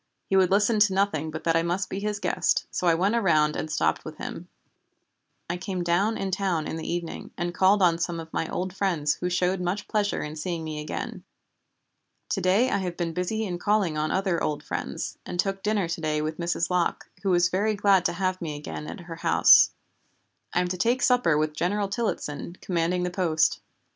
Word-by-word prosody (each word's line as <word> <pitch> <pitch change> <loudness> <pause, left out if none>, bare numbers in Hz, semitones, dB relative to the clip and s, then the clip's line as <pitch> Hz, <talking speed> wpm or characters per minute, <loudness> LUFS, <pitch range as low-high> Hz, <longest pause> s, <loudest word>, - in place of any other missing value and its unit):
He 195 - 0
would 190 -2 +5
listen 205 +3 +3
to 205 -2 +4
nothing 175 -6 +1
but 155 0 -6
that 165 -1 +2
I 165 - +4
must 175 +3 -1
be 195 - -4
his 210 0 -2
guest, - - +1
so 180 - -1
I 165 - +5
went 190 +6 +1
around 155 -9 +3
and 155 - -3
stopped 80 - 0
with - - -8
him. - - -7 1.0
I 175 - -2
came 180 0 -3
down 195 +6 +1
in 195 -1 -3
town 185 -5 0
in - - -4
the 160 - -4
evening, 170 -1 -4
and 175 0 -2
called 190 +2 +4
on 170 -2 +4
some 170 -1 -2
of 160 0 -9
my 165 - -1
old 185 +1 -3
friends 170 -7 0
who 180 - 0
showed 180 +1 +1
much 185 +4 -2
pleasure 210 -1 0
in 150 +1 -6
seeing 165 +1 -3
me 155 -1 -5
again. 150 - -5 1.1
To - - -1
day 200 +8 +3
I 200 - +1
have 180 -2 -4
been 170 -2 -2
busy 220 +5 -1
in 175 -3 -4
calling 205 -5 +1
on 155 0 0
other 190 -3 0
old 150 -1 -2
friends, - - -4
and 175 - -6
took 195 +1 0
dinner 210 -3 0
to 165 -1 -3
day 155 -1 0
with 155 +1 -3
Mrs. 170 0 -1
Locke, 180 -2 0
who 195 - -1
was 175 -1 +4
very 210 +4 +1
glad 195 -2 +4
to - - +1
have 185 +1 -1
me 155 -3 -4
again 150 +1 -7
at - - -7
her 170 -1 -8
house. - - +6 0.8
I 180 - +2
am 180 - 0
to 185 - -2
take 240 +7 +1
supper 245 - +3
with 155 0 0
General 200 +6 0
Tillottson, 185 -6 -3
commanding 180 0 0
the 180 - -1
post. 170 -4 +1
180 Hz, 215 wpm, -26 LUFS, 165-195 Hz, 1.1 s, house